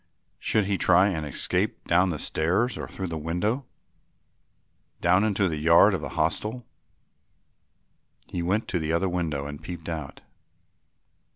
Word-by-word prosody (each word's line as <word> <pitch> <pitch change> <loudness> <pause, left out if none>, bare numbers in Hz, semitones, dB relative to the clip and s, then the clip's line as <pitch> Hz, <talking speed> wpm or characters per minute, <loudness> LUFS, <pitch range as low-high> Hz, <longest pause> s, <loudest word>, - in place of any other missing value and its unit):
Should 105 -2 +1
he 100 -1 -1
try 90 +3 +5
and 80 -5 -3
escape 95 - -1
down 90 +2 +3
the 80 - -2
stairs 95 +13 0
or - - -5
through 95 - -6
the 80 -1 -4
window, 105 - -2 1.3
down 90 +3 +3
into 100 -2 +1
the 80 -3 -2
yard 85 +2 +6
of - - -1
the - - -5
hostel? 115 +3 -1 1.6
He 90 - -4
went 100 +6 0
to 90 - 0
the 80 0 -2
other 85 +3 +1
window 80 -6 -2
and 75 +1 -7
peeped 85 0 -7
out. 80 -5 -6
90 Hz, 150 wpm, -26 LUFS, 80-100 Hz, 1.6 s, yard